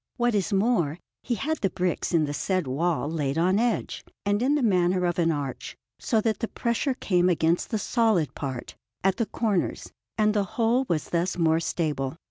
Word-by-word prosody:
What 240 -1 +2
is 200 -2 0
more, 195 -7 +1 0.2
he 240 - -2
had 315 +7 -2
the 195 - +1
bricks 180 -1 -1
in 165 -3 +3
the 145 - -4
said 185 +2 -1
wall 155 +4 0
laid 150 -2 -2
on 185 +4 +3
edge 235 -1 -1 0.2
and 205 +1 +1
in 275 +4 +3
the 290 - +1
manner 180 -3 +2
of 175 0 0
an 165 -1 +3
arch, 140 -4 -4 0.2
so 230 -6 +1
that 220 -2 0
the 230 - -1
pressure 235 +5 -1
came 180 -6 +2
against 170 0 +1
the 220 - 0
solid 215 - +1
part, 130 -3 -5 0.3
at 195 +1 +2
the 230 -2 0
corners, 205 -4 -1 0.3
and 215 -1 +3
the 205 -1 +2
whole 240 +3 +2
was 155 -3 -1
thus 175 +2 0
more 160 -1 +3
stable. 150 -4 -2
185 Hz, 195 wpm, -26 LUFS, 165-225 Hz, 0.3 s, in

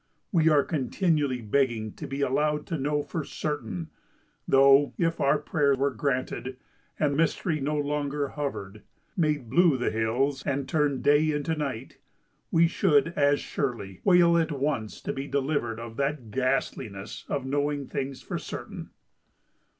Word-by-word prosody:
We 160 -3 +4
are 150 -2 +4
continually 145 - 0
begging 110 -2 0
to - - -7
be 135 +1 -4
allowed 150 +3 +1
to 165 - -3
know 145 +2 0
for 160 - -4
certain; 115 - -4 0.6
though, 135 +1 +5
if 165 -1 0
our 140 +2 +4
prayer 145 -1 +1
were 140 +1 +1
granted, 130 -1 -2 0.4
and 145 -2 +1
Mystery 160 +1 +1
no 145 +2 -1
longer 145 -1 -1
hovered, 110 -9 -5 0.3
made 150 - 0
blue 165 +2 +4
the 125 - 0
hills, 125 +5 0
and 140 -1 -2
turned 145 -5 0
day 145 +2 +4
into 150 +1 -1
night, 135 -5 -5 0.5
we 165 0 +4
should, 165 -3 +3
as 145 -3 +2
surely, 115 -9 -4
wail 175 -2 +5
at 165 -1 0
once 135 -6 -2
to - - -3
be 135 +1 -5
delivered 135 -5 -1
of 115 -1 -8
that 140 -5 -2
ghastliness 120 -5 -2
of 140 -2 -2
knowing 145 +1 -1
things 135 +1 -4
for - - -4
certain! - - -7
140 Hz, 150 wpm, -27 LUFS, 130-150 Hz, 0.6 s, though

